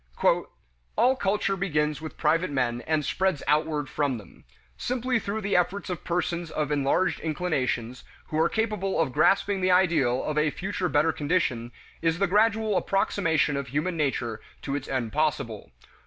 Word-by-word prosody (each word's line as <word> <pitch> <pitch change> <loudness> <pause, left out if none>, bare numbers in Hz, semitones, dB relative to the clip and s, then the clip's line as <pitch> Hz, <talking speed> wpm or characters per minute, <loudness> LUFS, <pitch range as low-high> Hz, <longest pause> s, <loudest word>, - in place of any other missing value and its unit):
"All 255 +2 +4
culture 195 -3 0
begins 150 -5 0
with 160 - -8
private 165 +4 +2
men 125 -4 0
and 155 -2 +1
spreads 190 -6 0
outward 150 0 +1
from 140 -4 -1
them. 105 - -15 0.3
Simply 250 0 -1
through 215 +1 -3
the 200 0 0
efforts 180 +2 0
of 175 - -5
persons 170 -1 -1
of 150 -2 -2
enlarged 145 +6 +1
inclinations, 130 -7 -2 0.3
who 155 - -1
are 165 - +4
capable 210 -4 -1
of 160 -5 +1
grasping 195 +5 +3
the 185 - +2
ideal 160 -9 +3
of 150 0 0
a 150 0 +3
future 185 +2 -3
better 155 +1 +3
condition, 145 -7 0 0.3
is 165 0 +1
the 195 - +2
gradual 215 +1 +2
approximation 165 -7 +1
of 140 -2 -3
human 155 +7 -1
nature 125 -7 -1 0.2
to 140 - -3
its 145 - -4
end 120 -4 -2
possible. 145 -8 -1
160 Hz, 160 wpm, -26 LUFS, 145-190 Hz, 0.3 s, All